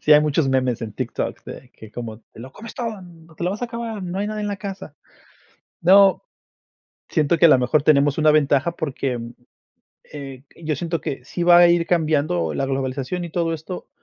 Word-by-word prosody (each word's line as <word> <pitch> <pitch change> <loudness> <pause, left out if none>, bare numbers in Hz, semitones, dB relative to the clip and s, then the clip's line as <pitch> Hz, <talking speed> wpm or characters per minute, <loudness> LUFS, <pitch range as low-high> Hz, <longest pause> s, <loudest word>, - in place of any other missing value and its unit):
Sí 150 - +4
hay 150 - +8
muchos 150 -1 +1
memes 130 -3 0
en 110 -2 -5
TikTok - - -4
de 125 - -10
que 110 -3 -14
como: 115 -1 -7
"Te - - -13
lo 130 +3 -10
comes 225 +8 -11
todo, 230 -6 -4 0.4
te - - -4
lo 180 - +1
vas 210 +5 -5
a - - 0
acabar, 230 -3 -5
no 180 +1 -4
hay 205 - -1
nada 215 0 -4
en 210 - -2
la 205 - -3
casa". 195 -7 -8 0.9
No, 195 +2 +5 0.9
siento 155 +1 +1
que 170 - +5
a 165 - +8
lo 130 - +6
mejor 125 +4 +1
tenemos 145 -2 +3
una 155 -1 +4
ventaja 145 +1 +2
porque, 135 -5 -3
mm, 115 0 -7 0.8
eh, 135 -3 -8 0.2
yo 155 -1 -1
siento 165 +2 -3
que 130 -2 -5
sí 175 - -4
va 175 0 +7
a 175 0 +7
ir 170 -1 +2
cambiando 150 - 0
la 135 - -1
globalización 135 +5 -3
y 170 - -7
todo 165 0 -1
esto 165 +3 -8
155 Hz, 210 wpm, -22 LUFS, 135-180 Hz, 0.9 s, hay